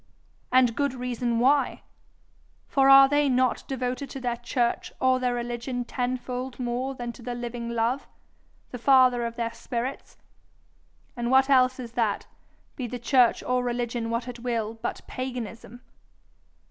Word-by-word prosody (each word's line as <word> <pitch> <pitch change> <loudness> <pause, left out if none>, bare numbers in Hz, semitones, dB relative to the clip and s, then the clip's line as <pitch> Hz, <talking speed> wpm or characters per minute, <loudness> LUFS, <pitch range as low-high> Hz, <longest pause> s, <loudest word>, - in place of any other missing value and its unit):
And 250 -3 +4
good 280 -1 0
reason 245 -1 -2
why! 275 +4 +2 0.8
For 270 -1 +3
are 270 0 +9
they 290 0 +2
not 255 -1 +1
devoted 260 +1 -3
to 270 - -7
their 245 -2 -2
church 240 0 -1
or 260 0 +3
their 250 -1 0
religion 240 +1 -3
tenfold 250 +1 -3
more 250 +2 -2
than 240 -1 -5
to 240 - -14
the 240 0 -5
living 240 -1 -5
Love, 235 +3 -1 0.6
the 250 - -6
father 255 -1 +5
of 230 - -8
their 230 -1 -3
spirits? 250 +3 -5 1.0
and 240 0 -2
what 265 +2 +4
else 255 -1 +4
is 240 -2 -7
that, 225 -4 -1 0.5
be 255 - -4
the 245 - -5
church 245 0 +3
or 250 0 0
religion 240 -1 -2
what 230 +2 -2
it 245 -1 -7
will, 230 -3 -2
but - - -3
paganism? 245 -2 -6
245 Hz, 150 wpm, -26 LUFS, 235-255 Hz, 1.0 s, are